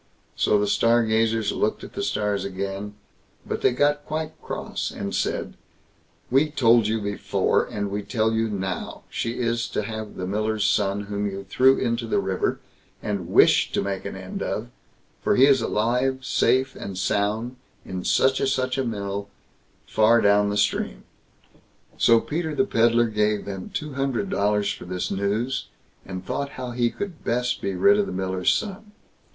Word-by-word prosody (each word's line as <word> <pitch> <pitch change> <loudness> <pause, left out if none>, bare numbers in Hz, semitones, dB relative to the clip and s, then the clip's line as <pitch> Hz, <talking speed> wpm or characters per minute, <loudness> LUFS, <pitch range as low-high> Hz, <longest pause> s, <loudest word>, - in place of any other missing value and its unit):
So 105 - +3
the 105 - +1
Stargazers 115 0 +2
looked 105 - -1
at - - -10
the - - -3
stars 105 - -1
again, 100 +1 -4 0.5
but - - -3
they - - +4
got 145 +3 +2
quite 155 0 -3
cross, - - -4
and 100 -1 -5
said, - - -1 0.8
"We 140 +4 +4
told 120 -6 +4
you 110 +1 0
before, 100 -1 0
and 100 -1 -4
we 100 +1 -2
tell 110 +2 0
you 110 0 +1
now, 95 -3 -4
she 115 - -2
is 115 -1 0
to - - -2
have 110 0 -6
the 90 - -4
miller's 105 +2 0
son, 100 -1 +1
whom 100 0 -3
you 100 0 -6
threw 130 +7 +4
into 115 -1 -1
the - - +1
river, 95 -1 -1 0.4
and 100 -5 -3
wished - - +4
to - - +1
make 100 -1 -3
an - - -5
end - - -6
of; - - -3 0.5
for - - +3
he 130 - +7
is 135 -3 +4
alive, 125 +4 0
safe 130 +1 +2
and 95 -2 -6
sound, 105 +6 -1 0.3
in 95 -1 -5
such 130 0 +3
and 135 - +1
such 130 0 0
a - - +1
mill, 100 -3 -4 0.6
far 115 +2 +4
down 100 -1 +4
the 105 - -1
stream." 100 - 0 1.0
So 115 -1 +6
Peter 155 +4 -3
the 200 - +3
Pedlar 120 - +3
gave 105 -1 0
them 95 -2 -6
two 150 -7 -4
hundred 135 +7 -1
dollars 105 0 +1
for - - -10
this 90 0 -3
news, 105 +7 -1 0.4
and 95 -1 -6
thought 140 +6 -3
how 125 -1 -4
he 120 0 +1
could 185 +3 -6
best 125 +1 0
be 100 -1 -2
rid 200 - +5
of 205 - +1
the - - -5
miller's 95 0 0
son. 210 0 -3
110 Hz, 175 wpm, -24 LUFS, 100-130 Hz, 1.0 s, he